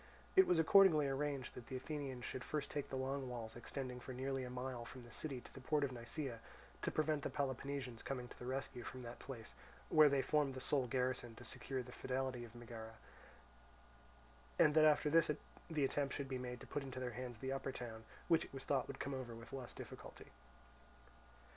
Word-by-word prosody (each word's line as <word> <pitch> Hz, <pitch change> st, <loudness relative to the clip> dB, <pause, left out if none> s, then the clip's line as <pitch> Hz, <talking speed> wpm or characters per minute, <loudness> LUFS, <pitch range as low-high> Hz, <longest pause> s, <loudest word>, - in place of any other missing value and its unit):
It 380 Hz, 0 st, +9 dB
was 175 Hz, -, +5 dB
accordingly 165 Hz, -3 st, +7 dB
arranged 140 Hz, -1 st, -1 dB
that 120 Hz, -, -9 dB
the 130 Hz, -, -4 dB
Athenians 135 Hz, -2 st, -3 dB
should 130 Hz, -, -3 dB
first 150 Hz, +1 st, -2 dB
take 145 Hz, -2 st, -2 dB
the -, -, -3 dB
long 130 Hz, 0 st, -1 dB
walls 115 Hz, -2 st, -4 dB
extending 125 Hz, +1 st, -4 dB
for 130 Hz, +1 st, -6 dB
nearly 135 Hz, +1 st, -1 dB
a 125 Hz, -, -4 dB
mile 125 Hz, -1 st, -3 dB
from 125 Hz, +1 st, -9 dB
the 120 Hz, -, -12 dB
city 135 Hz, -5 st, -3 dB
to -, -, -14 dB
the 135 Hz, -, -9 dB
port 150 Hz, +2 st, +2 dB
of 140 Hz, -, +1 dB
Nisaea, 120 Hz, +1 st, -3 dB, 0.4 s
to -, -, +1 dB
prevent 155 Hz, -1 st, +2 dB
the -, -, -1 dB
Peloponnesians 135 Hz, -3 st, -2 dB
coming 125 Hz, -2 st, -3 dB
to -, -, -13 dB
the 125 Hz, -, -6 dB
rescue 130 Hz, -1 st, -2 dB
from 125 Hz, +1 st, -6 dB
that 120 Hz, 0 st, -7 dB
place, 120 Hz, -5 st, -7 dB, 0.4 s
where 155 Hz, -1 st, +8 dB
they 140 Hz, -1 st, +3 dB
formed 145 Hz, -3 st, +2 dB
the -, -, -3 dB
sole 130 Hz, 0 st, +2 dB
garrison 125 Hz, -1 st, 0 dB
to 120 Hz, -, -10 dB
secure 130 Hz, +3 st, -3 dB
the 125 Hz, -, -10 dB
fidelity 130 Hz, -1 st, -1 dB
of 120 Hz, 0 st, -10 dB
Megara; 115 Hz, -1 st, -7 dB, 1.6 s
and 155 Hz, -3 st, +7 dB
that 155 Hz, 0 st, +7 dB
after 150 Hz, -1 st, +5 dB
this 165 Hz, 0 st, +6 dB, 0.4 s
the 150 Hz, -4 st, +2 dB
attempt 140 Hz, +1 st, 0 dB
should 140 Hz, -, -2 dB
be 130 Hz, -1 st, -2 dB
made 125 Hz, -1 st, -4 dB
to -, -, -7 dB
put 145 Hz, -, -2 dB
into 130 Hz, -2 st, -5 dB
their 125 Hz, -1 st, -2 dB
hands 125 Hz, -1 st, -5 dB
the 130 Hz, +3 st, -3 dB
upper 135 Hz, 0 st, -2 dB
town, 115 Hz, -3 st, -6 dB, 0.2 s
which 165 Hz, -1 st, +5 dB
it -, -, -15 dB
was 135 Hz, -, -5 dB
thought 135 Hz, -3 st, +1 dB
would -, -, -4 dB
then -, -, -7 dB
come 140 Hz, -, -2 dB
over 125 Hz, -3 st, -4 dB
with 115 Hz, +3 st, -10 dB
less 130 Hz, -3 st, -4 dB
difficulty. -, -, -9 dB
130 Hz, 215 wpm, -40 LUFS, 125-140 Hz, 1.6 s, It